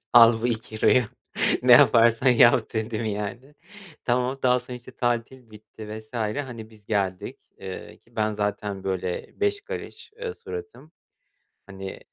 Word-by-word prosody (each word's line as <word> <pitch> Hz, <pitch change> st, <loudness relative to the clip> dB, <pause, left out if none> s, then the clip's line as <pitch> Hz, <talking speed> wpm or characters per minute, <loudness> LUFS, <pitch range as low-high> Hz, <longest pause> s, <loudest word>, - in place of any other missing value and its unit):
"Al 115 Hz, -1 st, +7 dB
bu -, -, +2 dB
€2'yu 115 Hz, +1 st, +2 dB, 0.6 s
ne 125 Hz, -, +6 dB
yaparsan 120 Hz, +1 st, +6 dB
yap." 120 Hz, -1 st, +5 dB
dedim, 110 Hz, 0 st, -2 dB
yani. 110 Hz, +6 st, -5 dB, 0.5 s
Tamam 125 Hz, +2 st, 0 dB
daha 125 Hz, 0 st, +3 dB
sonra, 125 Hz, 0 st, -8 dB
işte, 125 Hz, +1 st, -13 dB
tatil 120 Hz, 0 st, -2 dB
bitti 110 Hz, 0 st, -12 dB
vs. 110 Hz, +1 st, -16 dB
Hani, 115 Hz, 0 st, -4 dB
biz 110 Hz, -2 st, -18 dB
geldik, 95 Hz, -3 st, -2 dB, 0.2 s
ııı, 95 Hz, -1 st, -8 dB
ki -, -, -29 dB
ben 110 Hz, 0 st, +1 dB
zaten, 105 Hz, -1 st, -3 dB
böyle, 95 Hz, -, -4 dB
beş 410 Hz, 0 st, +1 dB
karış, 460 Hz, -, -8 dB
ııı, 460 Hz, -2 st, -3 dB
suratım. 435 Hz, -, -9 dB, 0.7 s
Hani, 95 Hz, -1 st, -8 dB
115 Hz, 140 wpm, -25 LUFS, 105-125 Hz, 0.7 s, Al